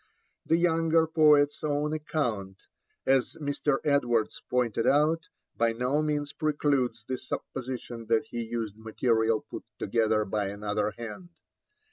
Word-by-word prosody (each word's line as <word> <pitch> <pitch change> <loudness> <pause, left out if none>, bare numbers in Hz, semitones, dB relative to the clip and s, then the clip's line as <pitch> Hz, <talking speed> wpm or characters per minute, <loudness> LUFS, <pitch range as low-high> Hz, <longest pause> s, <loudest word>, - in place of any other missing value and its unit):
The 165 - +4
younger 165 -1 +3
poet's 150 -3 +4
own 150 0 0
account, 120 -11 -2 0.5
as 135 -1 +2
Mr. 145 -2 0
Edwards 120 -6 +1
pointed 120 -3 +1
out, 155 +3 +3 0.3
by 115 0 +2
no 125 +6 0
means 145 -1 -1
precludes 140 -6 0
the 130 -1 -2
supposition 125 -3 -6
that 115 -1 +2
he 120 - -5
used 110 -2 -4
material 110 0 +1
put - - -9
together 110 0 +1
by 105 0 -1
another 105 +1 -1
hand. 120 - -7
125 Hz, 125 wpm, -28 LUFS, 110-150 Hz, 0.5 s, The